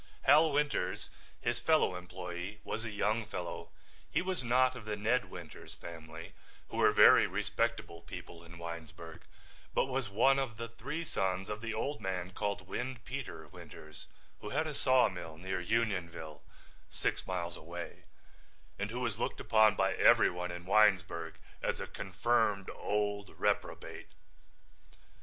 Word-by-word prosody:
Hal 155 +3 +6
Winters, 145 +1 0 0.3
his - - 0
fellow 90 - +3
employee, 90 +2 -6
was 110 - -3
a 115 - -4
young 105 +2 0
fellow. 90 -4 -5 0.4
He - - +1
was 185 -6 -2
not 130 +2 +3
of 120 -4 -9
the 105 -1 -2
Ned 105 0 +1
Winters 85 -4 -10
family, 80 -1 -9 0.4
who - - -6
were - - +6
very - - +8
respectable 85 - -1
people 85 0 -9
in 85 0 -12
Winesburg, 85 -1 -8 0.5
but - - +4
was 130 -4 -2
one 135 +7 +4
of 125 -5 -3
the 115 0 -5
three 140 +8 -4
sons 95 - -1
of 105 0 -4
the 115 -1 -3
old 125 +2 -2
man 95 -2 -3
called 100 -2 -3
Windpeter 125 +2 -5
Winters 75 -1 -11 0.3
who 105 - -6
had 155 +6 0
a 155 - -3
sawmill 110 - +2
near 95 +3 -3
Unionville, 90 -8 -1 0.5
six - - -2
miles 85 -2 -2
away, 85 +2 -8 0.7
and 100 +1 -1
who 120 +3 -4
was 115 -5 -1
looked - - -2
upon 110 -1 +5
by - - +2
everyone 90 0 +4
in 90 0 -6
Winesburg 95 -5 +3 0.3
as - - -1
a - - -3
confirmed 100 0 0
old 105 -1 -2
reprobate. - - -1
105 Hz, 145 wpm, -33 LUFS, 90-115 Hz, 0.7 s, very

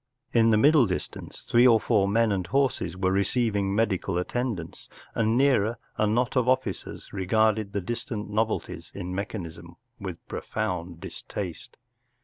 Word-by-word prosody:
In 115 -1 +5
the 110 - +5
middle 145 +1 +5
distance 90 - -6
three 120 +2 +6
or 115 -2 +6
four 105 -5 +2
men 115 +2 +3
and 95 -3 -1
horses 135 -4 0
were 95 0 +1
re¬ 100 - +3
ceiving 100 -3 0
medical 100 -4 0
attendance, 95 -3 -3 0.2
and - - -5
a - - +3
little 115 - +2
nearer 120 -5 +3 0.2
a 110 - +2
knot 120 +5 +1
of 125 -1 +3
officers 130 - -2
regarded 110 +2 +1
the 100 0 -2
dis¬ 120 +6 -4
tant 105 -3 -4
novelties 110 +1 -2
in 90 -2 -5
mechanism 95 -4 -6 0.2
with - - -7
profound 85 -1 -4
dis¬ - - -8
taste. 90 -5 -6
105 Hz, 165 wpm, -27 LUFS, 95-120 Hz, 0.2 s, three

